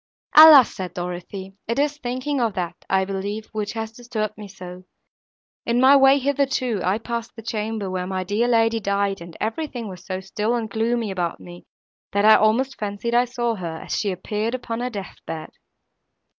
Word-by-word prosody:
"Alas," 305 Hz, -5 st, +10 dB
said 185 Hz, -3 st, -6 dB
Dorothée, 180 Hz, +2 st, -6 dB
"it 230 Hz, -, -1 dB
is 290 Hz, +1 st, 0 dB
thinking 255 Hz, +2 st, -2 dB
of 225 Hz, -4 st, 0 dB
that, 175 Hz, -2 st, -2 dB, 0.2 s
I 190 Hz, 0 st, +2 dB
believe, 200 Hz, +3 st, -4 dB
which 210 Hz, -1 st, -3 dB
has 225 Hz, -1 st, -4 dB
disturbed 225 Hz, -3 st, -4 dB
me 210 Hz, -1 st, -9 dB
so. 180 Hz, -1 st, -10 dB, 0.8 s
In 235 Hz, +1 st, +1 dB
my 265 Hz, +2 st, +7 dB
way 270 Hz, 0 st, +6 dB
hither 280 Hz, 0 st, +1 dB
too, 250 Hz, -6 st, -1 dB
I 185 Hz, +4 st, +1 dB
passed 235 Hz, 0 st, -5 dB
the 225 Hz, -, -10 dB
chamber, 215 Hz, -2 st, -3 dB
where 185 Hz, -1 st, -3 dB
my 185 Hz, -1 st, -2 dB
dear 205 Hz, +6 st, 0 dB
lady 225 Hz, -1 st, +3 dB
died, 200 Hz, -2 st, -1 dB
and 170 Hz, -1 st, -10 dB
everything 235 Hz, 0 st, -3 dB
was 185 Hz, -2 st, -9 dB
so 185 Hz, -1 st, -4 dB
still 210 Hz, +4 st, -2 dB
and 230 Hz, -2 st, -2 dB
gloomy 225 Hz, 0 st, -1 dB
about 175 Hz, -3 st, -2 dB
me, 175 Hz, 0 st, -12 dB, 0.5 s
that 200 Hz, +1 st, +2 dB
I 220 Hz, -, +9 dB
almost 235 Hz, +6 st, +2 dB
fancied 210 Hz, +3 st, -3 dB
I 240 Hz, +1 st, +4 dB
saw 240 Hz, -1 st, -1 dB
her, 165 Hz, -3 st, -5 dB
as -, -, -3 dB
she 205 Hz, -2 st, 0 dB
appeared 210 Hz, +5 st, -3 dB
upon 235 Hz, -2 st, -4 dB
her 250 Hz, +1 st, -2 dB
death 200 Hz, -6 st, -7 dB
bed." 160 Hz, -1 st, -6 dB
215 Hz, 190 wpm, -23 LUFS, 190-240 Hz, 0.8 s, Alas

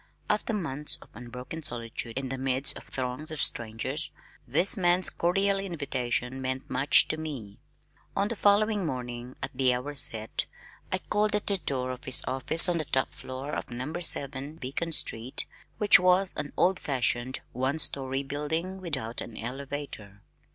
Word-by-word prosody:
After 210 Hz, +2 st, 0 dB
months 150 Hz, -8 st, +2 dB
of -, -, -21 dB
unbroken 125 Hz, +7 st, -8 dB
solitude 115 Hz, -4 st, -4 dB
in 135 Hz, -1 st, -2 dB
the 135 Hz, -, -3 dB
midst 130 Hz, +1 st, +1 dB
of -, -, -10 dB
throngs 130 Hz, +4 st, -2 dB
of 155 Hz, -1 st, -2 dB
strangers, 120 Hz, +7 st, +2 dB, 0.4 s
this 155 Hz, +10 st, +4 dB
man's 180 Hz, -1 st, +3 dB
cordial 195 Hz, +3 st, +1 dB
invitation 130 Hz, -8 st, -3 dB
meant 130 Hz, 0 st, -3 dB
much 140 Hz, -, +5 dB
to 155 Hz, -, -1 dB
me. 135 Hz, -11 st, -7 dB, 0.6 s
On 200 Hz, +1 st, +1 dB
the 235 Hz, -, -3 dB
following 205 Hz, 0 st, +3 dB
morning, 125 Hz, -4 st, -5 dB
at -, -, -3 dB
the 130 Hz, -1 st, +3 dB
hour 135 Hz, +4 st, -5 dB
set, 110 Hz, -5 st, +1 dB, 0.4 s
I -, -, +1 dB
called 210 Hz, 0 st, 0 dB
at 210 Hz, -, -1 dB
the 200 Hz, -2 st, +2 dB
door 130 Hz, -5 st, -2 dB
of 125 Hz, -, -8 dB
his 130 Hz, -, +4 dB
office 135 Hz, +7 st, +6 dB
on 175 Hz, -2 st, +1 dB
the 155 Hz, -, -2 dB
top 130 Hz, -1 st, 0 dB
floor 130 Hz, +3 st, -7 dB
of -, -, -4 dB
No. 125 Hz, +6 st, -5 dB
7 145 Hz, -4 st, -2 dB
Beacon 160 Hz, +3 st, -4 dB
Street, 120 Hz, -4 st, +2 dB, 0.3 s
which 210 Hz, -3 st, +7 dB
was 180 Hz, +1 st, +3 dB
an 150 Hz, -1 st, -4 dB
old 185 Hz, +2 st, +3 dB
fashioned 130 Hz, -1 st, -1 dB
one 130 Hz, +4 st, -1 dB
story 135 Hz, -2 st, +1 dB
building 160 Hz, +7 st, -3 dB
without 130 Hz, -10 st, -3 dB
an 115 Hz, -, -8 dB
elevator. 125 Hz, -5 st, -6 dB
140 Hz, 165 wpm, -28 LUFS, 125-170 Hz, 0.6 s, which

